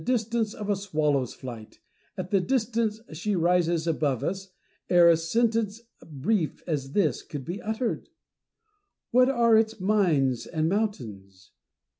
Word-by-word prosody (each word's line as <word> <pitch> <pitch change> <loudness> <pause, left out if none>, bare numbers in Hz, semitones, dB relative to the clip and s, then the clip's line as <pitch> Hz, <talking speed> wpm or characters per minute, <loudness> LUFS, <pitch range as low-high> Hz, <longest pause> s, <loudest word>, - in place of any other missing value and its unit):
distance 230 -2 0
of 210 - -6
a 205 - +2
swallow's 150 - -1
flight, 115 -4 -9 0.2
— - - -40
at 185 -1 -5
the 195 -2 +3
distance 225 -2 0
she 195 +6 -2
rises 170 -1 +2
above 150 -6 0
us, 195 +1 -3 0.4
ere 175 -1 +6
a 170 - +7
sentence 225 +5 0 0.2
brief 160 +4 -2
as 140 -5 -3
this 160 -11 +1
could 140 -4 -8
be 180 +4 -5
uttered. 220 +2 -3 1.0
What 255 +1 +5
are 235 -4 +4
its 220 0 +2
mines 170 - +1
and 160 -1 -1
mountains 110 - -4
185 Hz, 140 wpm, -26 LUFS, 155-220 Hz, 1.0 s, a